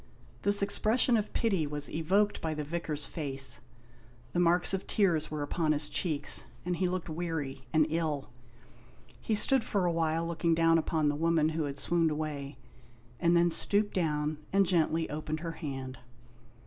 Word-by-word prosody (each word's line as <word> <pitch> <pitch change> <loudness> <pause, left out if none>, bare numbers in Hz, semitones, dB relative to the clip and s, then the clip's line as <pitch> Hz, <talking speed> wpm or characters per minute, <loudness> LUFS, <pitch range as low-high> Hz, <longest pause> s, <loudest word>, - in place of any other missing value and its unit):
This 200 0 +5
expression 230 +4 +2
of 215 -2 -1
pity 195 -10 0
was 145 0 0
evoked 195 +6 +1
by 160 -1 -2
the 150 - -3
Vicar's 150 -1 -3
face. 135 -4 -1 0.7
The 175 - -1
marks 175 +2 +2
of 190 - -3
tears 175 -7 +1
were 150 -1 -3
upon 155 +1 0
his 145 0 -1
cheeks, 155 -5 0 0.2
and 180 -1 -1
he 185 0 +1
looked 180 -1 -3
weary 155 -5 -4
and 155 -1 +4
ill. 155 -3 -2 0.9
He 220 - 0
stood 265 +4 +4
for 200 -4 0
a 175 - +2
while 165 0 0
looking 170 0 0
down 165 0 +4
upon 155 -1 0
the 145 - +1
woman 160 0 +2
who 160 -1 -2
had 140 -1 -5
swooned 165 +2 +1
away, 150 -3 -4 0.6
and 170 0 +3
then 170 0 +3
stooped 205 +4 +1
down, 150 -3 -1
and 195 0 +4
gently 165 -2 +1
opened 155 +1 -4
her 165 -1 -4
hand. 135 -5 -6
165 Hz, 170 wpm, -30 LUFS, 150-175 Hz, 0.9 s, This